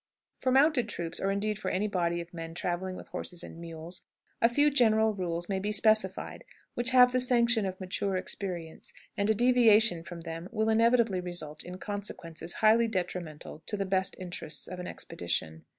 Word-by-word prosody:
For 260 - +1
mounted 265 -3 +4
troops, 170 -4 -4
or, 195 - 0
indeed, 210 +1 -1
for 190 - -2
any 200 +3 0
body 170 -3 0
of 170 +1 -11
men 165 -1 -7
traveling 180 +1 -2
with - - -10
horses 175 -2 -1
and 165 - -10
mules, 165 +1 -8 0.4
a 230 - +6
few 290 +5 +4
general 220 -4 +4
rules 175 -3 -3
may 195 -1 -1
be 205 +2 -2
specified 215 -2 +1 0.3
which 240 +1 0
have 250 -1 +7
the 255 - +2
sanction 235 -4 +3
of 185 0 -5
mature 190 +1 -2
experience, 175 -3 -5 0.2
and 200 +1 0
a 220 - +4
deviation 230 -5 +5
from 170 0 -9
them 165 +2 -6
will 220 0 0
inevitably 225 -3 +3
result 175 -4 -5
in 180 +1 -8
consequences 175 -5 -5
highly 230 +2 +6
detrimental 175 -6 -4
to 210 - -2
the 195 - -1
best 190 0 0
interests 175 -4 -4
of 185 0 -7
an 180 - -5
expedition. 80 -2 -4
190 Hz, 180 wpm, -29 LUFS, 175-220 Hz, 0.4 s, have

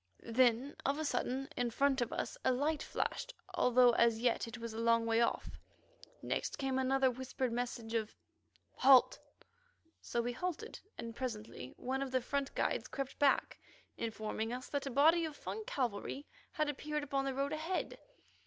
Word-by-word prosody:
Then 250 +3 +3
of 275 +2 +1
a 315 - -2
sudden, 260 0 -1
in 245 -1 0
front 270 +2 +2
of 240 - -1
us - - -3
a - - +4
light 290 +4 0
flashed, - - -3 0.2
although 250 0 +5
as 230 -1 +4
yet 240 0 +1
it 230 +2 -7
was 230 -1 -6
a 220 - -5
long 230 0 +3
way 230 0 +3
off. 235 - -1 0.6
Next - - -2
came 265 -1 0
another 265 0 +3
whispered 260 0 -3
message 235 -1 -3
of 220 -1 -1 0.6
"Halt!" 260 -1 +6 0.8
So 235 - -2
we 240 +1 0
halted, 365 - -4 0.2
and 230 -1 -6
presently 220 - -5
one 265 +2 -2
of 275 - -2
the 260 0 +2
front 275 +2 -2
guides - - 0
crept 275 -1 -5
back, 285 -1 +3 0.4
informing 220 0 -3
us 250 +1 -5
that 285 -1 -2
a - - -1
body 315 +6 +5
of 310 -2 -4
Fung 440 - -5
cavalry 255 - -2 0.3
had 305 -3 +1
appeared 300 +1 -2
upon 275 -1 -1
the 270 -1 -2
road 275 +2 -1
ahead. 325 +4 -2
260 Hz, 170 wpm, -35 LUFS, 235-280 Hz, 0.8 s, Halt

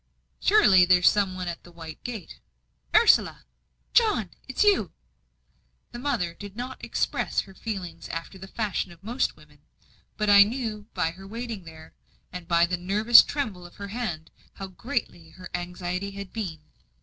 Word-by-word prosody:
"Surely 205 - +6
there's 180 0 +5
some 200 -3 +3
one 185 -1 -5
at 170 -1 -5
the 175 - -15
white 165 -2 -10
gate. 235 -5 -7 0.6
Ursula!" 460 - +4 0.5
"John! 420 - +3
Ah - - -31
it 260 - -8
is - - +5
you." 400 - +3 1.0
The 240 - -7
mother 240 -11 -1
did 200 +2 -10
not 250 +2 -7
express - - -1
her 195 - -14
feelings 190 -6 -6
after 165 +3 -6
the 190 - -9
fashion 200 -3 -2
of 170 +1 -17
most 235 +5 -1
women; - - -20 0.6
but 210 - -1
I 200 -1 +8
knew 215 -1 0
by 170 -3 0
her 190 +3 -12
waiting 225 -3 -6
there, 160 -1 -13 0.4
and 180 -2 -7
by 170 0 +4
the 180 +1 -2
nervous 210 +6 +7
tremble 220 -11 -4
of 175 - -13
her 200 0 -7
hand, 195 -9 -4 0.2
how 195 - -7
great 235 +6 -2 0.3
her 185 -1 -11
anxiety 180 +2 -4
had 200 -1 -9
been. 180 -9 -5
195 Hz, 170 wpm, -26 LUFS, 175-225 Hz, 1.0 s, I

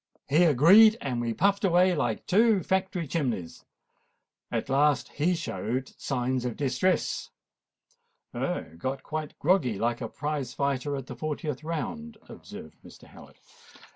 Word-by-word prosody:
He 160 +6 +4
agreed; 190 - +7
and 125 -3 -3
we 120 -1 -1
puffed 200 +1 +2
away 180 0 +4
like 120 -7 -2
two 215 0 +3
factory 190 -3 -1
chimnies. 125 - -3 0.9
At - - -2
last 145 +1 +2
he 170 +5 0
showed 130 - -4
signs 130 -1 -2
of 125 -2 -4
distress——" 140 +7 0 1.0
"Ah! - - -2 0.2
got 130 +6 -3
quite 155 -1 -5
groggy, 140 - +2
like 120 +3 -1
a 115 - -4
prize 145 -4 -4
fighter 140 0 -1
at 135 -2 -5
the - - -8
fortieth 150 -2 -4
round," 220 +9 -5
observed - - -11
Mr. - - -15
Howard. - - -15
145 Hz, 140 wpm, -27 LUFS, 130-180 Hz, 1.0 s, agreed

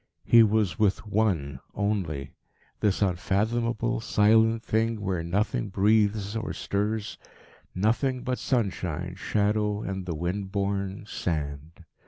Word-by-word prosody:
He 115 - +7
was 105 -6 +2
with 105 -1 +2
One 95 -11 0 0.2
only 90 -9 -2 0.5
this 105 -1 +1
unfathomable, 115 +6 0
silent 110 +1 +3
thing 110 0 0
where 95 -4 -1
nothing 85 - -1
breathes 105 +1 +2
or 110 0 -3
stirs 105 +1 -2 0.6
nothing 120 +6 +1
but 125 0 -2
sunshine, 90 - -1
shadow 105 +2 0
and 95 -2 -4
the 85 - -2
wind 95 +4 -3
borne 100 0 -2
sand. 80 -2 -4
100 Hz, 115 wpm, -27 LUFS, 90-110 Hz, 0.6 s, He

